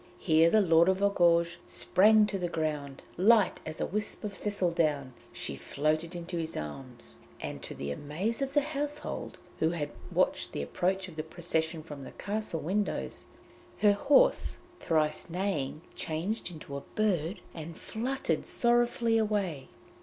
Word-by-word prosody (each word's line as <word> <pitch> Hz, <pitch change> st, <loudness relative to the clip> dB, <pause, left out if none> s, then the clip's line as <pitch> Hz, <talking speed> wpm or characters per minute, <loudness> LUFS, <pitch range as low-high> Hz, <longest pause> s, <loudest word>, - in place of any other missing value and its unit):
Here 160 Hz, 0 st, +4 dB
the 215 Hz, +4 st, +5 dB
Lord 170 Hz, -1 st, +5 dB
of 190 Hz, -, +3 dB
Argouges 170 Hz, -3 st, +4 dB
sprang 215 Hz, +2 st, +5 dB
to 200 Hz, -2 st, -3 dB
the 175 Hz, -1 st, -1 dB
ground; 150 Hz, -4 st, -3 dB
light 210 Hz, +2 st, +4 dB
as 155 Hz, -, -6 dB
a -, -, +1 dB
wisp 210 Hz, +3 st, -3 dB
of 210 Hz, -1 st, -3 dB
thistledown, 165 Hz, -10 st, 0 dB, 0.2 s
she 70 Hz, -, -4 dB
floated 155 Hz, -, -1 dB
into 175 Hz, 0 st, -4 dB
his 160 Hz, 0 st, -4 dB
arms, 75 Hz, -, -8 dB, 0.2 s
and -, -, -5 dB
to -, -, -7 dB
the 70 Hz, +1 st, -4 dB
amaze 175 Hz, -, -2 dB
of 275 Hz, +1 st, -2 dB
the 290 Hz, -, +6 dB
household, 295 Hz, 0 st, -4 dB, 0.2 s
who 160 Hz, -, +3 dB
had 155 Hz, -4 st, -3 dB, 0.2 s
watched -, -, +1 dB
the -, -, -2 dB
approach 185 Hz, -, -1 dB
of 170 Hz, -3 st, -12 dB
the -, -, 0 dB
procession 160 Hz, 0 st, -2 dB
from 145 Hz, -3 st, -8 dB
the -, -, -9 dB
castle 205 Hz, -5 st, -3 dB
windows, 200 Hz, +6 st, -2 dB, 0.5 s
her 205 Hz, -1 st, +5 dB
horse, 290 Hz, -, +4 dB, 0.2 s
thrice 155 Hz, +1 st, 0 dB
neighing, 165 Hz, -5 st, -2 dB
changed 175 Hz, +9 st, -3 dB
into 155 Hz, -4 st, -8 dB
a 140 Hz, -, -4 dB
bird, 190 Hz, -4 st, +1 dB
and 165 Hz, 0 st, -7 dB
fluttered 235 Hz, -, -2 dB
sorrowfully 235 Hz, -1 st, +2 dB
away. 200 Hz, -10 st, -1 dB
175 Hz, 155 wpm, -30 LUFS, 155-210 Hz, 0.5 s, the